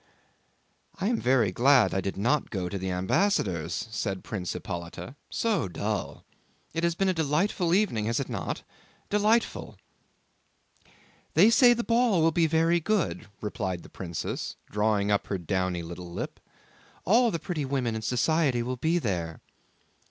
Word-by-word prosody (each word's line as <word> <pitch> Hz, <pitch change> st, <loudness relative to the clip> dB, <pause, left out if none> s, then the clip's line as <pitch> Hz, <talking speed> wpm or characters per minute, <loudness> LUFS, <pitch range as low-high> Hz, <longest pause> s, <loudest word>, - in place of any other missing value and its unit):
"I 195 Hz, +3 st, +1 dB
am 240 Hz, -, +1 dB
very 120 Hz, -6 st, +3 dB
glad 130 Hz, +4 st, +4 dB
I 95 Hz, -, 0 dB
did 95 Hz, 0 st, -4 dB
not 125 Hz, +8 st, +1 dB
go 95 Hz, -4 st, -3 dB
to 100 Hz, -, -4 dB
the 95 Hz, 0 st, -3 dB
ambassador's," 90 Hz, -, 0 dB
said 100 Hz, -3 st, -3 dB
Prince 90 Hz, -6 st, -4 dB
Hippolyte 85 Hz, +8 st, -6 dB, 0.2 s
"—so 215 Hz, -, 0 dB
dull—. 85 Hz, -, -4 dB, 0.5 s
It 165 Hz, +1 st, -2 dB
has 170 Hz, -1 st, +2 dB
been 195 Hz, +2 st, +1 dB
a 185 Hz, -, +3 dB
delightful 165 Hz, +3 st, 0 dB
evening, 180 Hz, -, +1 dB
has 115 Hz, +1 st, 0 dB
it 140 Hz, -, -3 dB
not? 110 Hz, -7 st, -4 dB, 0.5 s
Delightful!" 215 Hz, +3 st, +1 dB, 1.6 s
"They 200 Hz, +8 st, +7 dB
say 240 Hz, +1 st, +7 dB
the 235 Hz, -, -2 dB
ball 230 Hz, -8 st, +3 dB
will 165 Hz, -, +4 dB
be 165 Hz, 0 st, +3 dB
very 165 Hz, +2 st, +3 dB
good," 180 Hz, -1 st, -1 dB
replied 95 Hz, -4 st, -3 dB
the -, -, -13 dB
princess, 85 Hz, -3 st, -5 dB, 0.2 s
drawing 105 Hz, -1 st, +1 dB
up 100 Hz, -, +1 dB
her 100 Hz, -, -1 dB
downy 90 Hz, 0 st, -1 dB
little 85 Hz, +1 st, -8 dB
lip. -, -, -5 dB, 0.7 s
"All 235 Hz, +5 st, +5 dB
the 170 Hz, -, -1 dB
pretty 165 Hz, -3 st, -3 dB
women 130 Hz, -4 st, -1 dB
in 110 Hz, -, -3 dB
society 125 Hz, +2 st, +1 dB
will 125 Hz, +1 st, -3 dB
be 160 Hz, +7 st, +1 dB
there." 85 Hz, -, -2 dB
125 Hz, 155 wpm, -27 LUFS, -, 1.6 s, They